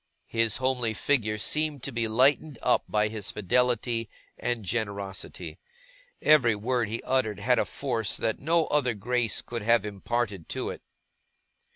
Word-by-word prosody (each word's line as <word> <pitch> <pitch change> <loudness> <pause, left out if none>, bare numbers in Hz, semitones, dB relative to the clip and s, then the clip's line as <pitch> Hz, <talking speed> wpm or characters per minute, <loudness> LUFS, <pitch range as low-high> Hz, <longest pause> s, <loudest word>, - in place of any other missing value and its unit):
His 115 -2 +1
homely 125 -4 0
figure 110 -4 +1
seemed 150 +4 0
to 140 - -2
be 115 -2 -1
lightened 135 +5 +3
up - - +3
by 105 0 +2
his 105 -2 -4
fidelity 115 +1 0 0.3
and 120 -3 -3
generosity. 100 -2 -4 0.6
Every 130 -8 +5
word 115 +1 -1
he 115 +2 -4
uttered 125 -6 0
had 120 +3 +2
a - - +2
force 115 -6 -1
that 110 - -1
no 165 +3 +2
other 125 -6 +1
grace 120 +2 0
could 120 -1 -5
have 115 -1 +3
imparted 105 -2 -3
to - - -3
it. - - -9
115 Hz, 150 wpm, -27 LUFS, 105-130 Hz, 0.6 s, Every